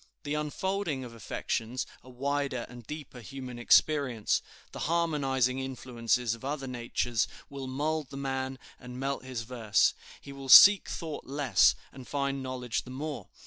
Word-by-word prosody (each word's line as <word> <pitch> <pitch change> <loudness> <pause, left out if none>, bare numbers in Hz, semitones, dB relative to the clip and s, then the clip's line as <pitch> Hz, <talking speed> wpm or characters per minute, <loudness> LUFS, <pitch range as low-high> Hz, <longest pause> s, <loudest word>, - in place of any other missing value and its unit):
"The 145 - -3
unfolding 150 0 -2
of 120 -2 -9
affections, 115 +2 -3 0.2
a 130 - -15
wider 140 -1 -2
and 120 -2 -12
deeper 150 -4 -8
human 125 +1 -8
experience, 130 -3 +3 0.3
the - - -8
harmonizing 135 -6 +1
influences 125 -3 -1
of 115 - -10
other 140 0 -3
natures, 120 -2 -1 0.2
will 135 -1 -6
mould 150 +2 -2
the 135 - -8
man 135 -1 -3 0.2
and 125 0 -9
melt 135 -1 -2
his 130 -3 -5
verse. 115 -3 +2 0.3
He 140 - -10
will 135 -1 -8
seek 205 +8 +10
thought 160 -3 -5
less 140 0 +4 0.2
and 130 -2 -11
find 140 -1 -1
knowledge 130 -2 -3
the - - -13
more. 140 -4 -5
130 Hz, 150 wpm, -29 LUFS, 125-145 Hz, 0.3 s, seek